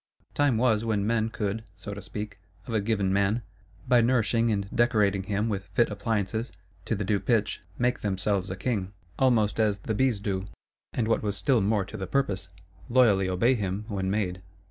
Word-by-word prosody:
Time 145 -5 +2
was 110 -2 +2
when 105 -3 0
men 115 0 +1
could 110 0 -3
(so 100 +3 -7
to 100 - -7
speak) 105 +1 -7 0.3
of 120 - -6
a 110 - +2
given 100 -3 0
man, 100 +4 +1 0.4
by 125 -1 +5
nourishing 115 -1 +2
and 100 -2 -1
decorating 105 -5 +3
him 105 +3 -1
with 100 -3 -2
fit 120 - +3
appliances, 110 +2 -2 0.3
to 115 - 0
the 105 - -2
due 100 +1 +1
pitch, 110 -2 0 0.2
make 125 +1 +1
themselves 100 -1 0
a 95 - -3
King, 100 -2 -2 0.3
almost 115 -5 +3
as 105 -2 +2
the 100 +3 -3
Bees 125 -1 +2
do; 95 -1 -2 0.5
and 115 -3 -1
what 115 - +2
was 105 -2 -1
still 110 +6 +2
more 100 0 +1
to 105 +3 -8
the 95 -2 -4
purpose, 95 -7 0 0.4
loyally 110 -7 +4
obey 105 +8 +3
him 100 -2 -2
when 95 -2 -2
made. 95 -3 -1
105 Hz, 190 wpm, -27 LUFS, 100-115 Hz, 0.5 s, by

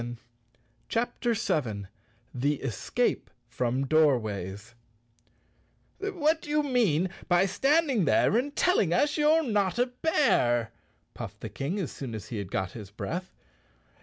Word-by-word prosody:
83 120 0 -6 0.7
CHAPTER 235 0 0
7 120 - -1 0.5
The 140 +4 +1
Escape 115 - -1 0.2
From 125 +2 -1
Doorways 110 - +1 1.3
"TT7HAT 320 -6 +1
do - - -10
you 300 0 +2
mean 200 - +2 0.2
by 175 +1 +4
standing 270 - +2
there 195 - +3
and 280 +5 0
tell 360 0 +3
ing 170 -4 +2
us 290 - +2
you're 310 +2 +4
not 205 - 0
a 245 - +3
bear?" 245 - +1 0.4
puffed - - -8
the - - -5
King, 150 +9 -3
as 180 - -3
soon 125 -5 -6
as 105 - -8
he 115 - -4
had 100 -3 -5
got 95 -1 -2
his 105 -5 -9
breath. 175 - -5
175 Hz, 140 wpm, -28 LUFS, -, 1.3 s, by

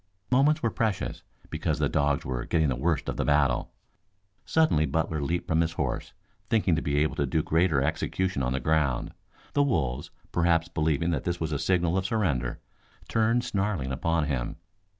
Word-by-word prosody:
Moments 145 +4 +3
were 115 - +2
precious 110 -5 -2 0.3
because - - -1
the - - +1
dogs 70 0 +1
were 65 -2 -2
getting 80 -3 +1
the 65 - 0
worst 80 +4 0
of - - -3
the - - +1
battle. 75 -4 +2 0.8
Suddenly 120 - +3
Butler 80 +2 -1
leaped 85 +5 -2
from 80 0 +2
his 85 0 0
horse - - -3 0.4
thinking 100 -6 +3
to 80 - -1
be 70 -2 -1
able 75 +1 +1
to 70 - +1
do 80 +3 +1
greater 80 -4 +2
execution 95 +2 -1
on 65 0 0
the 65 - -1
ground. 75 -2 0 0.4
The 145 - +3
wolves, 65 - 0 0.2
perhaps 85 -1 +2
believing 80 +1 0
that 70 -5 -1
this 85 0 -2
was 80 -1 -2
a 70 - -1
signal 90 +3 +2
of 95 - -2
surrender, 70 - -1 0.5
turned 115 +2 +2
snarling 95 - -1
upon 80 +5 0
him. 65 -5 -2
80 Hz, 180 wpm, -27 LUFS, 70-95 Hz, 0.8 s, Moments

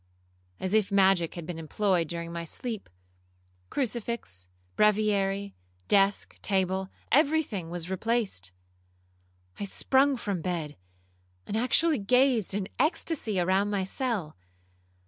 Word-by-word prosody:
As 185 +1 -2
if 215 -2 +3
magic 190 -4 +3
had 170 -2 -6
been 165 0 -5
employed 175 +1 +1
during 170 +1 -5
my 170 0 -4
sleep, 220 +5 -6 0.8
crucifix, 230 - -3 0.3
breviary, 200 -2 +2 0.3
desk, 195 0 +2
table, 190 -1 0 0.2
every 310 +3 +4
thing 190 - -5
was 175 -1 -4
replaced. 195 - -1 1.1
I - - -2
sprung 265 +6 +2
from 200 -7 -3
bed, 165 -4 -3 0.7
and - - -4
actually 255 +6 +3
gazed 240 -1 +3
in 200 -2 -2
extasy 300 - 0
around 190 +3 +2
my 200 -2 0
cell. 200 - -2
200 Hz, 115 wpm, -28 LUFS, 180-235 Hz, 1.1 s, every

